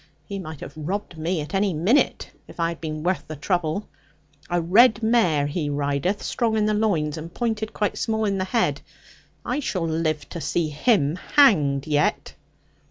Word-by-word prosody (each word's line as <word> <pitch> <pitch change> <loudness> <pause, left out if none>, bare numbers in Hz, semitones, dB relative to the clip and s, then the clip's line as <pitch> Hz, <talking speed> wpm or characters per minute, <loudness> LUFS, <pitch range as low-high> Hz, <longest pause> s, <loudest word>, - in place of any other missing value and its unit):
He 200 -1 -5
might 160 -5 -8
have 140 - -8
robbed 180 +5 -4
me 160 +1 -2
at 150 +1 -8
any 195 -2 +1
minute, 195 - +1 0.2
if - - -14
I 165 0 +1
had 170 - -7
been 155 -1 -4
worth 185 +2 -1
the 155 - -6
trouble. 175 +4 -1 0.6
A 175 0 +1
red 220 +7 +5
mare 220 -11 +3
he 145 +1 -2
rideth, 145 +7 -1
strong 225 -3 0
in 210 - +2
the 215 - +1
loins, 170 -8 0
and 165 +2 -8
pointed 220 0 -2
quite 210 - -2
small 220 -1 0
in 195 -2 0
the 185 - 0
head. 225 +4 0 0.6
I - - -1
shall 185 - -2
live 160 -2 -1
to 170 - -6
see 165 -1 0
him 150 - +2
hanged 155 - +3
yet.' 150 -1 0
175 Hz, 180 wpm, -24 LUFS, 155-210 Hz, 0.6 s, red